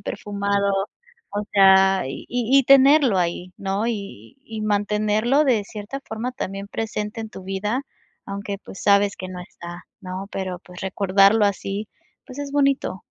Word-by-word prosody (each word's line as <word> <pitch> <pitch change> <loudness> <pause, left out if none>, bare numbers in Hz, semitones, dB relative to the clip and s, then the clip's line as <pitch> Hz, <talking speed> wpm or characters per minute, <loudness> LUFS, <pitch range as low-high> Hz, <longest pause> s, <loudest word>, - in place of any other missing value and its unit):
perfumado. 200 0 -1 0.6
O 205 0 -1
sea, 190 -1 +6
y 135 - -7
y 245 +2 +3
y - - +5
tenerlo 275 -3 +6
ahí, 180 0 -1
¿no? 195 +3 -2
Y 200 - -6
y 220 -1 -6
mantenerlo 215 +6 +1
de 230 -7 +2
cierta 210 +6 -7
forma 230 +3 -4
también 200 -6 -5
presente 215 0 -4
en 220 - -8
tu 190 - -10
vida, 205 +7 -2 0.4
aunque, 200 0 -5
pues, 195 - -10
sabes 200 0 +4
que 185 - -7
no 180 -1 -7
está, 175 0 -10 0.2
¿no?, 185 +1 -6
pero, 185 -2 -4
pues, 180 0 -13
recordarlo 195 +2 +4
así, 200 +1 -3 0.4
pues 260 0 -10
es 285 -1 -5
bonito. 275 -9 +1
205 Hz, 155 wpm, -23 LUFS, 195-225 Hz, 0.6 s, sea